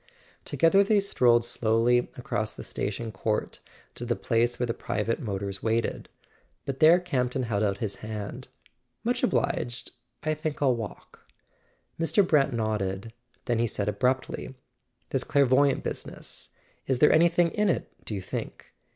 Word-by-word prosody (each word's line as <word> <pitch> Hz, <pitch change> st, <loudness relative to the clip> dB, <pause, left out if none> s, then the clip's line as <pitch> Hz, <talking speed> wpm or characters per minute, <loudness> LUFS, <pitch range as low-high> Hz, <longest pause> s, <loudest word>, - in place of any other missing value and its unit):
To¬ -, -, -5 dB
gether 180 Hz, +4 st, +6 dB
they 205 Hz, +1 st, +3 dB
strolled 120 Hz, -12 st, +3 dB
slowly 120 Hz, +1 st, +2 dB
across 110 Hz, -3 st, -2 dB
the -, -, -9 dB
station 110 Hz, +3 st, -4 dB
court 105 Hz, +2 st, -2 dB, 0.3 s
to -, -, -7 dB
the 120 Hz, 0 st, 0 dB
place 120 Hz, +1 st, +1 dB
where 125 Hz, -, +1 dB
the 115 Hz, -, -1 dB
private 115 Hz, -1 st, -2 dB
motors 100 Hz, -3 st, -4 dB
waited; 115 Hz, 0 st, -1 dB, 0.6 s
but 135 Hz, -1 st, -4 dB
there 165 Hz, +3 st, +7 dB
Campton 130 Hz, -7 st, -1 dB
held 110 Hz, -4 st, -1 dB
out 100 Hz, -2 st, +1 dB
his 100 Hz, -2 st, -3 dB
hand. 105 Hz, -1 st, -6 dB, 0.6 s
"Much -, -, 0 dB
obliged; 120 Hz, 0 st, -1 dB, 0.3 s
I 155 Hz, -, +1 dB
think 155 Hz, -1 st, -4 dB
I'll 135 Hz, -4 st, +3 dB
walk." 110 Hz, -5 st, -9 dB, 0.7 s
Mr. 180 Hz, +4 st, +3 dB
Brant 145 Hz, -3 st, +3 dB
nodded; 110 Hz, -2 st, -2 dB, 0.3 s
then 120 Hz, -2 st, 0 dB
he 120 Hz, -, +2 dB
said 105 Hz, -2 st, -2 dB
abruptly: 125 Hz, +5 st, -1 dB, 0.6 s
"This -, -, 0 dB
clairvoyante 140 Hz, 0 st, +3 dB
business: -, -, -5 dB, 0.4 s
is 130 Hz, -, +2 dB
there 150 Hz, -, +6 dB
anything 170 Hz, +1 st, +4 dB
in 210 Hz, -1 st, +1 dB
it, -, -, -1 dB
do 105 Hz, -, -5 dB
you 95 Hz, -, -3 dB
think? -, -, -6 dB
120 Hz, 150 wpm, -27 LUFS, 110-140 Hz, 0.7 s, there